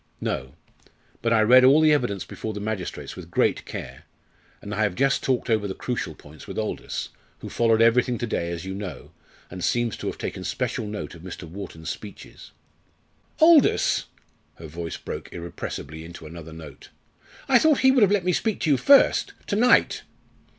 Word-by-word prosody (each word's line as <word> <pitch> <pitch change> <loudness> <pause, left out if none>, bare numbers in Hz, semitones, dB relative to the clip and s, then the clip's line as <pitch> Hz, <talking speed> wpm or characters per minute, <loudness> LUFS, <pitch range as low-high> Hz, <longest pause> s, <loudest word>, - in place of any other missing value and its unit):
"No. 65 +1 -3 0.7
But 115 - 0
I 115 -1 +4
read 125 +4 +7
all 135 +4 +7
the 155 -1 +5
evidence 120 -9 -1
before 110 -1 -6
the - - -4
magistrates 105 -3 -5
with - - -10
great - - +1
care, - - -8 0.5
and 105 - -7
I 105 - -1
have 100 -4 +1
just 135 +3 +2
talked 130 -2 0
over 110 -3 +1
the 95 - -5
crucial 105 -10 -4
points 75 0 -14
with - - -7
Aldous, 110 -1 -4 0.3
who - - -7
followed 115 -1 +3
everything 120 +1 +3
to 120 - -2
day, 85 -6 -2
as 85 +1 -5
you 95 - -4
know, 95 -8 -7 0.4
and 90 0 -7
seems 120 -2 0
to - - -6
have - - -4
taken - - -5
special 110 - -2
note 105 0 -6
of 85 - -12
Mr. 90 0 -8
Wharton's 80 -3 -7
speeches." 105 -2 -11 0.9
"Aldous!" 320 -2 +5 0.5
her 80 - -11
voice 80 +2 -6
broke - - -7
irrepressibly 85 -2 -7
into 85 -1 -11
another 80 0 -10
note 80 -3 -12 0.6
"I 260 -3 +6
thought 310 0 +3
he 265 - +6
would 260 -2 +3
have 205 -2 +5
let 200 -4 +1
me 180 - +2
speak 220 +4 -1
to 155 - +2
you 140 - +4
first! 280 - +5
to 200 - -2
night!" 245 +4 +4
110 Hz, 185 wpm, -24 LUFS, 85-135 Hz, 0.9 s, read